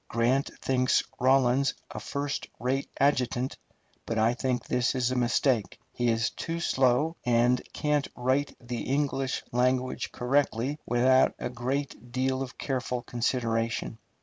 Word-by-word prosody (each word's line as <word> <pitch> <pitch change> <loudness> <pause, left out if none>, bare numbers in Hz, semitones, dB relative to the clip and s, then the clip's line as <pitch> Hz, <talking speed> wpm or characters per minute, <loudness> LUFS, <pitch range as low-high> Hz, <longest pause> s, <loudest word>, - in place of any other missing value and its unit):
Grant 120 +4 +1
thinks 130 -1 +2 0.2
Rawlins 130 +1 +3 0.2
a - - -5
first 140 0 -3
rate 130 +4 -1
adjutant, 130 -2 +1 0.5
but 115 - -1
I 110 +2 +3
think 125 0 -1
this 125 +1 +1
is 125 -1 +1
a - - -1
mistake. 120 -2 +1
He 120 -1 0
is 115 -1 +1
too 165 0 -4
slow, 135 +1 +2
and 120 +1 +3
can't 150 -2 0
write 130 +3 0
the 120 -1 -5
English 135 -1 -1
language 125 +1 0
correctly 135 +1 0
without 130 +2 +4
a - - -4
great 125 0 -3
deal 130 +1 0
of 130 -2 -6
careful 125 -2 -2
consideration. 115 -2 -1
125 Hz, 135 wpm, -28 LUFS, 120-135 Hz, 0.5 s, without